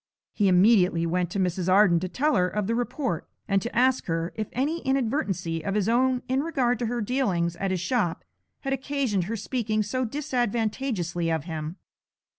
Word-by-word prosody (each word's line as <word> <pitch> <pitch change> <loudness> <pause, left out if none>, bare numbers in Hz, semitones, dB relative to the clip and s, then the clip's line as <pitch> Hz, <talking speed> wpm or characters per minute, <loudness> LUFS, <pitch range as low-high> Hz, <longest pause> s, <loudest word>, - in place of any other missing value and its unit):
He 205 - +2
immediately 180 -2 +4
went 175 +1 0
to 195 - -3
Mrs. 185 0 0
Arden 190 -3 +5
to 185 +2 -4
tell 295 - +1
her 180 -1 +3
of 210 +2 -2
the 225 - 0
report, 245 - -2 0.2
and 195 -1 +2
to 235 - -5
ask 255 +1 +3
her 165 0 -2
if 215 -2 -3
any 295 +7 -1
inadvertency 220 - -1
of 195 +4 -2
his 210 -2 +1
own 250 +2 +2
in 260 +1 +1
regard 260 -7 0
to 240 - -1
her 240 +1 -2
dealings 200 -8 0
at 195 +2 -1
his 185 -2 -1
shop 185 -4 0 0.4
had 270 -1 -1
occasioned 265 -8 -1
her 225 +4 -3
speaking 215 -1 -1
so 255 +4 -2
disadvantageously 225 - -1
of 160 -3 -1
him. 160 0 -5
210 Hz, 185 wpm, -26 LUFS, 180-255 Hz, 0.4 s, Arden